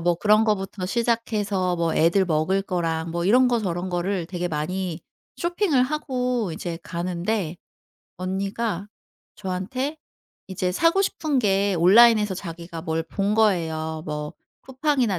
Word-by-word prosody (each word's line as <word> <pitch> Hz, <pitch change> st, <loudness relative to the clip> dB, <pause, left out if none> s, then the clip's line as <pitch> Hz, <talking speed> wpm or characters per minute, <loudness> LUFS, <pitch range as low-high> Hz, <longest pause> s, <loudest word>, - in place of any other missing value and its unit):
뭐 175 Hz, +1 st, +2 dB
그런 215 Hz, +4 st, +4 dB
것부터 195 Hz, -3 st, -1 dB
시작해서 210 Hz, -4 st, 0 dB
뭐 170 Hz, -1 st, 0 dB
애들 170 Hz, +4 st, +3 dB
먹을 175 Hz, +4 st, +1 dB
거랑 165 Hz, -3 st, -2 dB
뭐 170 Hz, +1 st, -2 dB
이런 250 Hz, +6 st, +5 dB
거 240 Hz, -, +2 dB
저런 180 Hz, -3 st, -2 dB
거를 180 Hz, 0 st, -1 dB
되게 180 Hz, -1 st, -3 dB
많이 170 Hz, +2 st, -3 dB, 0.4 s
쇼핑을 345 Hz, -6 st, +1 dB
하고 250 Hz, -, -1 dB
이제 165 Hz, 0 st, -5 dB
가는데 180 Hz, +1 st, -2 dB, 0.6 s
언니가 195 Hz, +2 st, -3 dB, 0.5 s
저한테 210 Hz, +10 st, -3 dB, 0.5 s
이제 185 Hz, -1 st, -2 dB
사고 330 Hz, -, +3 dB
싶은 310 Hz, -7 st, 0 dB
게 200 Hz, -3 st, +2 dB
온라인에서 210 Hz, +2 st, +6 dB
자기가 170 Hz, -2 st, -7 dB
뭘 160 Hz, -1 st, -2 dB
본 200 Hz, +4 st, -1 dB
거예요. 160 Hz, -7 st, +1 dB
뭐 150 Hz, -1 st, -4 dB, 0.3 s
쿠팡이나 260 Hz, -, 0 dB
190 Hz, 275 characters per minute, -24 LUFS, 170-225 Hz, 0.6 s, 온라인에서